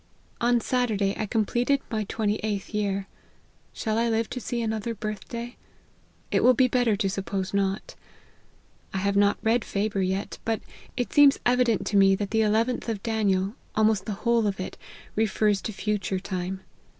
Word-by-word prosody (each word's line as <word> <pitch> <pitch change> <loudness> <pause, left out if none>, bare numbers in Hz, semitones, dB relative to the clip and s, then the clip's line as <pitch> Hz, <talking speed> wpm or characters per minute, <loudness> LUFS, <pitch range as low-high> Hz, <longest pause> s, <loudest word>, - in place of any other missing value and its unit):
On 240 0 +3
Saturday, 220 -5 0
I 215 - -3
completed 240 +5 +1
my 215 -2 -1
twenty 210 0 -1
eighth 210 -2 -3
year. 200 -2 -1 0.7
Shall 220 -1 -1
I 235 0 +2
live 225 0 0
to 250 - -3
see 240 0 -3
another 220 0 -2
birth 215 -1 -5
day? 235 +1 -6 0.7
it - - +2
will 250 0 +6
be 255 +2 +4
better 245 -4 +2
,to 200 -1 0
suppose 195 0 -3
not. 195 0 -1 1.0
I - - +1
have 200 +1 0
not 200 0 +4
read 225 +1 +2
Faber 200 0 -1
yet; 190 +2 -2
but 225 -1 0 0.4
it 245 - -2
seems 285 -1 +6
evident 245 -3 +2
to 205 - +1
me 195 0 +6
that 200 0 -4
the 220 - +2
Xlth 225 +3 +1
of 210 -3 -3
Daniel, 205 -4 +1 0.2
almost 215 -2 +3
the 215 - -1
whole 235 -2 +3
of 195 -2 -2
it, 185 - -5 0.4
refers 210 -2 +2
to - - -4
future 205 -2 -2
time. 185 0 -4
215 Hz, 175 wpm, -26 LUFS, 195-230 Hz, 1.0 s, will